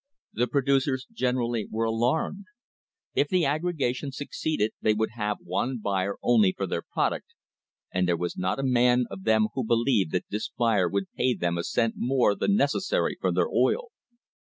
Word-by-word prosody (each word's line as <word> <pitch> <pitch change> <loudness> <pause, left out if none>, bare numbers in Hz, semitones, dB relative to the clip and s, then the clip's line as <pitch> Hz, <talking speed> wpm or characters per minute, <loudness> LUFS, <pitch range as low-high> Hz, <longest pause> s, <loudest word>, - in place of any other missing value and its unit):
The 120 +2 +1
producers 135 0 +1
generally 125 - -1
were 115 +1 -1
alarmed. 125 - 0 0.7
If - - +2
the 185 -5 +2
aggregation 145 -3 -1
succeeded 140 -4 -2
they 110 - +3
would 110 0 0
have 105 -2 -2
one 120 +8 -1
buyer 100 -2 -1
only 110 -6 +4
for 100 - -1
their 85 - -2
product, - - -2 0.6
and 90 0 +1
there 85 -1 +2
was 85 +1 -3
not 95 0 -1
a 135 - -3
man 125 -1 +3
of 95 -1 -8
them 110 -1 +3
who 130 - -2
believed 115 - +2
that 90 - 0
this 105 +3 -3
buyer 110 -7 +2
would 100 +2 0
ever - - -26
pay 125 -1 +2
them 85 -1 -1
a 85 - -1
v - - -7
cent 115 -1 +1
more 125 -4 +2
than, 200 - +1
necessary 170 +2 +1
for - - +1
their - - +1
oil. 480 -1 +1
115 Hz, 185 wpm, -27 LUFS, 100-135 Hz, 0.7 s, only